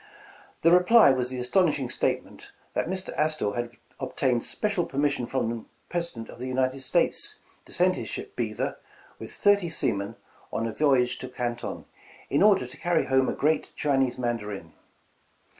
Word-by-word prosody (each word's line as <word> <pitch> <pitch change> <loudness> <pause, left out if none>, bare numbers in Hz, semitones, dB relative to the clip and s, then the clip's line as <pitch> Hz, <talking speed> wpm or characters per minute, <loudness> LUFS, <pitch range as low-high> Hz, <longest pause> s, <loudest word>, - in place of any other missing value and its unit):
"The 165 - +6
reply 180 0 +7
was 125 -1 0
the 130 - -4
astonishing 140 0 +2
statement, - - -2 0.2
that - - -1
Mr. 185 +1 -3
Astor 155 -9 +1
had 120 +1 -4 0.2
obtained 130 -2 0
special 205 -4 0
permission 140 -3 0
from 125 -4 -1
the 115 -1 -6 0.3
Presi 170 -3 -2
dent 115 -1 -7
of - - -11
the 130 - -4
United 130 +1 0
States, 175 - +1 0.3
to - - -13
send - - +3
his - - -5
ship - - -6
'Beaver' - - -2 0.4
with - - -8
thirty 200 -4 +3
seamen 100 -8 -1 0.4
on 115 - -1
a 115 - -3
voyage 125 -2 +2
to 130 - -6
Canton, 120 -2 -4 0.5
in 140 - +2
order 200 -10 +5
to 130 +4 -10
carry 170 +2 +1
home 130 0 +2
a - - -1
great 155 +1 0
Chinese 135 -4 +1
Mandarin. 105 -8 -4
130 Hz, 165 wpm, -27 LUFS, 120-165 Hz, 0.5 s, reply